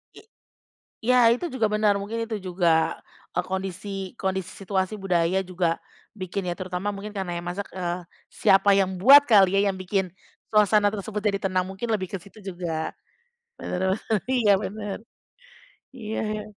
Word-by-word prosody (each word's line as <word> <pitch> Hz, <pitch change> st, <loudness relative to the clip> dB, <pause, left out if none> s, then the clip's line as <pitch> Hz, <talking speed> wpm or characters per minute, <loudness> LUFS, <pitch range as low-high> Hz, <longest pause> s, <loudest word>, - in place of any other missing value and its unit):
I -, -, -12 dB, 0.8 s
ya, 250 Hz, +2 st, +3 dB, 0.2 s
itu 250 Hz, +9 st, -1 dB
juga 225 Hz, -4 st, +2 dB
benar, 210 Hz, -1 st, +3 dB
mungkin 220 Hz, +3 st, -4 dB
itu 220 Hz, -1 st, -3 dB
juga, 180 Hz, -2 st, 0 dB, 0.7 s
eee, -, -, 0 dB
kondisi 190 Hz, +1 st, -4 dB, 0.3 s
kondisi 190 Hz, -1 st, -2 dB
situasi 190 Hz, +1 st, -1 dB
budaya 180 Hz, -1 st, +1 dB
juga 175 Hz, -2 st, 0 dB, 0.4 s
bikin, 185 Hz, +1 st, -3 dB
ya -, -, -2 dB
terutama 185 Hz, +2 st, -3 dB
mungkin 205 Hz, +1 st, -8 dB
karena 185 Hz, -3 st, -3 dB
yang 175 Hz, -, -8 dB
masak, 195 Hz, +3 st, -4 dB
eee, 180 Hz, -1 st, -3 dB, 0.3 s
siapa 195 Hz, +1 st, +4 dB
yang 190 Hz, -1 st, +1 dB
buat 280 Hz, +6 st, +9 dB
kali 195 Hz, -3 st, +6 dB
ya, 200 Hz, -, +2 dB
yang 190 Hz, -, -5 dB
bikin 185 Hz, -1 st, -1 dB, 0.4 s
suasana 210 Hz, -1 st, +4 dB
tersebut 210 Hz, 0 st, -4 dB
jadi 200 Hz, -1 st, +1 dB
tenang. 185 Hz, -1 st, +1 dB
Mungkin 195 Hz, +5 st, -5 dB
lebih 185 Hz, -3 st, -3 dB
ke 195 Hz, -, -2 dB
situ 200 Hz, +3 st, -16 dB
juga. 175 Hz, -4 st, -3 dB, 0.7 s
Bener 190 Hz, +1 st, -1 dB
bener, 215 Hz, -5 st, -1 dB
iya, 230 Hz, -5 st, +3 dB
bener. 205 Hz, +1 st, -5 dB, 1.0 s
Iya 220 Hz, -3 st, -5 dB, 0.2 s
ya. 210 Hz, -, -5 dB
195 Hz, 160 wpm, -25 LUFS, 185-210 Hz, 1.0 s, buat